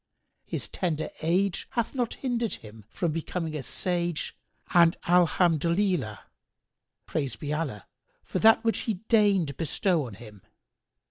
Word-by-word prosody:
His - - -3
tender 160 -4 -2
age 180 +4 +1
hath 235 -1 -1
not 245 -4 -1
hindered 240 -4 -1
him 105 -1 -13
from 170 -3 -1
becoming 165 0 -3
a 150 - -2
sage 175 +2 -1 0.4
and 170 -1 +6
Alhamdolillah—praised 170 - -1
be 150 0 -3
Allah—for 140 - -5
that 225 +1 +6
which 225 -1 +1
He 220 - +1
deigned 200 - +3
bestow 165 -1 +1
on 110 - -9
him! 105 -2 -13
170 Hz, 120 wpm, -27 LUFS, 150-195 Hz, 0.4 s, and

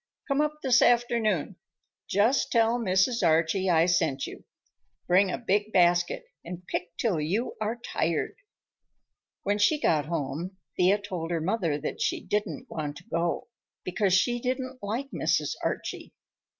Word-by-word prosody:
Come 275 +1 +2
up 300 0 -2
this 260 -3 +4
afternoon. 230 -7 +2 0.5
Just 220 +8 +2
tell 230 0 +3
Mrs. 210 +3 +2
Archie 165 +3 +2
I 165 -1 +4
sent 165 -6 +1
you. - - -10 0.6
Bring 185 +2 +4
a - - -2
big 210 -2 0
basket 175 -2 +3 0.2
and 180 +1 -8
pick 175 -1 -4
till 205 -9 0
you 200 +11 -1
are 215 +2 -1
tired." 170 -9 -2 1.1
When 205 +1 0
she 295 +9 +3
got 150 - +1
home 170 +3 -3 0.2
Thea 185 +3 +4
told 185 -5 -5
her 170 -1 0
mother 170 -3 0
that 155 - -4
she - - 0
didn't 205 -8 -3
want 150 -2 -5
to - - -13
go, 170 +5 -2 0.3
because 185 +1 +1
she 240 +5 +2
didn't 255 0 -3
like 230 +7 -3
Mrs. - - 0
Archie. - - -4
190 Hz, 150 wpm, -27 LUFS, 170-230 Hz, 1.1 s, this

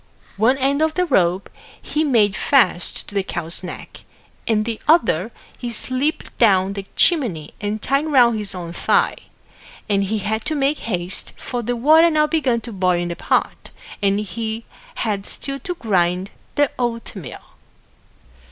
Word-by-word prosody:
One 235 +6 +3
end 275 +2 +1
of 315 0 +1
the 360 - +2
rope 185 - +2 0.3
he 305 - -1
made 220 -9 +3
fast 240 -7 +2
to - - -11
the 200 - +1
cow's 170 -3 -3
neck 180 - -9 0.4
and 215 -2 +2
the 225 -1 -4
other 235 - +3 0.2
he 240 - -5
slipped 255 +6 -2
down 195 -4 +4
the 200 -1 -6
chimney 225 - +2
and 210 +1 -2
tied 275 +7 0
round 245 -6 +5
his 205 -2 -3
own 170 -2 -6
thigh; - - +2 0.7
and 200 -2 +1
he 215 +3 -1
had 215 +2 -2
to 315 - -1
make 285 +1 +1
haste, 180 -2 -2
for 245 -1 -4
the 245 +1 -2
water 310 +7 +6
now 305 -1 +3
began 280 -7 0
to 235 - -8
boil 185 -2 +2
in 175 0 -2
the 170 - -3
pot, - - -1 0.3
and 200 0 +2
he 220 +2 -4 0.3
had 205 -3 -2
still 275 0 -5
to 360 +1 -5
grind 185 - 0 0.2
the 290 -2 +2
oatmeal. 230 - -4
225 Hz, 160 wpm, -21 LUFS, 195-275 Hz, 0.7 s, water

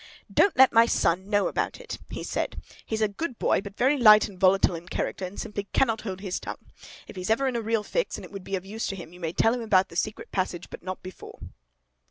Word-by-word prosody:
'Don't 400 - +4
let 265 0 +7
my 230 0 +6
son 185 -1 +1
know 205 -2 +2
about - - -2
it,' - - -7
he - - -6
said. - - -3 0.3
'He's 220 -1 -1
a - - +4
good 240 +5 -5
boy, - - +2
but 200 0 -10
very 270 +3 +3
light 215 -3 +8
and 190 -3 -13
volatile 190 0 +4
in 170 +1 -7
character, 190 - -3
and 185 +2 -8
simply 205 -1 -4
cannot 225 -5 +2
hold 190 -3 -6
his 190 -3 -3
tongue. - - -9 0.4
If - - -11
he's 185 +1 -5
ever 265 +5 +2
in 255 - -1
a 235 - 0
real 225 -1 0
fix, - - -1
and - - -9
it - - -14
would 195 -2 -8
be 195 - -3
of 185 0 -5
use 220 +3 -4
to 195 - -3
him, 175 -2 -10
you 180 - -13
may 165 -2 -3
tell 225 +5 +3
him 245 - -3
about 195 -4 +3
the - - -12
secret 210 +5 -3
passage; 185 -2 -3
but - - -8
not 185 +1 -6
before. 185 0 -10
205 Hz, 260 wpm, -26 LUFS, 185-230 Hz, 0.4 s, light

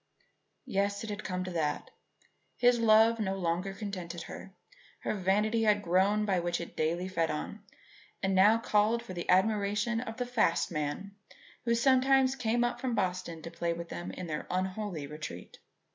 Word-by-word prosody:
Yes, 200 -3 -1
it 220 - -5
had 205 +1 -5
come 185 -1 -3
to 185 - -5
that. 155 -4 -2 0.7
His 245 -1 +4
love 225 0 +5
no 195 -3 -1
longer 180 +1 -1
contented 185 -5 -6
her. 195 - -9 0.5
Her - - -1
vanity 210 +3 +1
had 210 -2 +3
grown 195 +4 +2
by 190 -3 +1
what 175 0 -1
it 170 - -8
daily 170 +4 0
fed 165 -4 0
on, 155 +7 -4 0.6
and 190 0 +1
now 205 +4 +6
called 225 +1 +2
for 225 - -8
the 175 -1 -6
admiration 210 +3 +2
of 225 -2 -6
the 250 - -1
fast 220 -10 +1
men 155 +6 -3 0.5
who 235 -1 +3
sometimes 265 +1 +4
came 240 -1 +1
up 240 - -1
from 250 -3 -1
Boston 180 -3 -2
to 165 - -7
play 170 0 -1
with 170 0 -7
them 175 +1 -5
in 185 - -6
their 155 -2 -4
unholy 185 -3 -2
retreat. 150 - -8
195 Hz, 175 wpm, -30 LUFS, 175-225 Hz, 0.7 s, now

